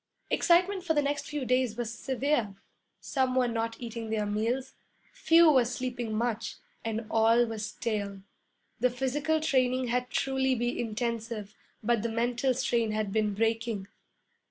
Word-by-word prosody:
Excitement 365 +2 +3
for 325 -3 0
the 295 - +4
next 285 0 -2
few 295 -3 -3
days 250 -3 +1
was 235 -1 -3
severe. 260 -4 -1 0.5
Some 260 -2 0
were 255 -1 +3
not 230 -1 -2
eating 230 -2 -6
their 215 -1 0
meals, 230 +6 -1 0.4
few 330 -1 +6
were 260 -4 +5
sleeping 245 -2 -3
much, 230 -1 -1 0.3
and 225 0 -3
all 225 +2 +4
were 225 -1 -5
stale. 210 -2 -3 0.6
The 250 +2 +3
physical 275 +5 0
training 255 -4 +1
had 250 +1 0
truly 265 -1 +1
been 240 0 -1
intensive, 225 -2 -3 0.3
but 235 0 +2
the 235 - -1
mental 240 +3 0
strain 235 -3 0
had 215 -2 -1
been 215 -2 +1
breaking. 225 -2 -1
240 Hz, 150 wpm, -29 LUFS, 225-260 Hz, 0.6 s, few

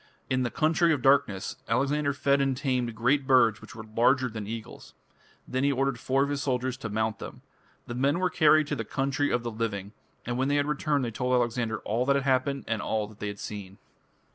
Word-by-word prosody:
"In 130 0 +2
the 120 - 0
Country 165 +4 +2
of 135 -5 -3
Darkness" 105 -8 +2
Alexander 140 +5 +1
fed 140 0 +1
and 135 -2 0
tamed 125 -4 -1
great 130 +4 +1
birds 120 -5 +4
which 130 - -12
were 110 - -8
larger 125 +4 +2
than 110 -3 -6
eagles. 115 0 -8 0.5
Then 130 +1 -1
he 140 - +3
ordered 135 -2 0
four 135 +3 +1
of 140 - -2
his 140 -1 -2
soldiers 130 -2 -1
to 115 -5 -6
mount 110 +1 -1
them. - - -9 0.4
The 120 - -6
men 135 +5 +1
were 185 0 0
carried 155 -1 +5
to 145 - 0
the 115 - -3
"Country 135 +4 -1
of 120 - 0
the 120 - -3
Living", 105 -3 -3 0.3
and 120 +1 -2
when 130 - +1
they 145 +1 +2
returned 145 -1 0
they 115 - -3
told 125 +2 0
Alexander 120 -3 0
"all 120 +4 -1
that 140 - +4
had 140 - +1
happened 135 +1 +1
and 110 -2 -1
all 110 +1 -1
that 105 -1 -16
they 105 - -3
had 100 0 -5
seen". 100 -2 -7
130 Hz, 220 wpm, -27 LUFS, 115-140 Hz, 0.5 s, carried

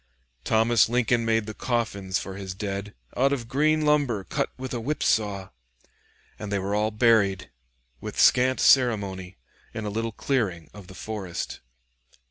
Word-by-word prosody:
Thomas 110 0 +3
Lincoln 120 -1 +1
made 115 -1 +1
the 110 - -6
coffins 105 -6 -2
for 95 - -6
his 95 -2 -6
dead 100 0 -5 0.2
"out 135 +2 +2
of 125 -5 -2
green 155 +4 +2
lumber 140 -9 +2
cut - - -2
with 130 0 -6
a 120 - -2
whipsaw," 105 -7 0 0.9
and 105 - -6
they 100 - +1
were 100 +1 -2
all 105 +1 +1
buried, 110 -4 +2 0.5
with - - -6
scant 130 +1 +4
ceremony, 100 -8 +2 0.4
in 110 - -4
a 105 - -3
little 115 +2 -2
clearing 100 - -2
of 100 -3 -12
the 95 - -12
forest. 95 -1 -5
110 Hz, 150 wpm, -25 LUFS, 100-120 Hz, 0.9 s, scant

